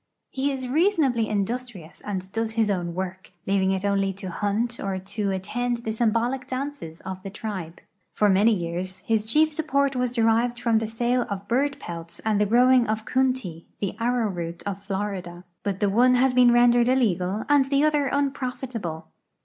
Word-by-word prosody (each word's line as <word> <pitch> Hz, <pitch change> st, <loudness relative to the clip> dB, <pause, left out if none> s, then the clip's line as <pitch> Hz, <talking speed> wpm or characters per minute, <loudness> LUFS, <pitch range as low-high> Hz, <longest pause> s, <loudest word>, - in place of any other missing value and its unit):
He 270 Hz, +2 st, 0 dB
is 260 Hz, -2 st, -4 dB
reasonably 280 Hz, -, +2 dB
industrious 210 Hz, -4 st, -4 dB
and 190 Hz, -2 st, -5 dB
does 225 Hz, +1 st, -2 dB
his 220 Hz, -2 st, +2 dB
own 175 Hz, -3 st, -2 dB
w'ork, 185 Hz, 0 st, -5 dB, 0.2 s
leaving 190 Hz, -1 st, +2 dB
it 190 Hz, +1 st, -1 dB
only 195 Hz, -1 st, +1 dB
to 190 Hz, -1 st, -7 dB
hunt 220 Hz, +5 st, -1 dB
or 195 Hz, -1 st, -2 dB
to 200 Hz, +2 st, -3 dB
attend 235 Hz, +5 st, -2 dB
the 220 Hz, -, -2 dB
symbolic 235 Hz, +3 st, 0 dB
dances 260 Hz, -, -5 dB
of 190 Hz, 0 st, -6 dB
the 195 Hz, -, -6 dB
tribe. 190 Hz, -5 st, -6 dB, 0.3 s
For 210 Hz, -, +2 dB
many 205 Hz, +3 st, +4 dB
years 185 Hz, 0 st, -3 dB
his 220 Hz, -1 st, +1 dB
chief 310 Hz, +6 st, +3 dB
support 280 Hz, -3 st, 0 dB
was 250 Hz, -1 st, 0 dB
derived 235 Hz, +1 st, +2 dB
from 230 Hz, -2 st, +2 dB
the 225 Hz, -, -3 dB
sale 240 Hz, +2 st, 0 dB
of 200 Hz, 0 st, -5 dB
bird 280 Hz, +4 st, 0 dB
l^elts 165 Hz, -1 st, -7 dB
and 215 Hz, -2 st, +2 dB
the 210 Hz, -, +3 dB
growing 250 Hz, +2 st, +5 dB
of 215 Hz, 0 st, -2 dB
coontie, 255 Hz, -11 st, -1 dB
the 200 Hz, -, -2 dB
arrowroot 205 Hz, -9 st, -1 dB
of 200 Hz, -1 st, -4 dB
Florida. 190 Hz, -3 st, -4 dB, 0.2 s
But 200 Hz, -2 st, -3 dB
the 205 Hz, -, +2 dB
one 250 Hz, +4 st, +5 dB
has 255 Hz, +1 st, +3 dB
been 250 Hz, -1 st, +6 dB
rendered 240 Hz, 0 st, +5 dB
illegal 205 Hz, -5 st, +1 dB
and 290 Hz, -2 st, +4 dB
the 275 Hz, +1 st, +2 dB
other 300 Hz, -2 st, +2 dB
unprofitable. 250 Hz, -, -3 dB
220 Hz, 175 wpm, -25 LUFS, 190-250 Hz, 0.3 s, been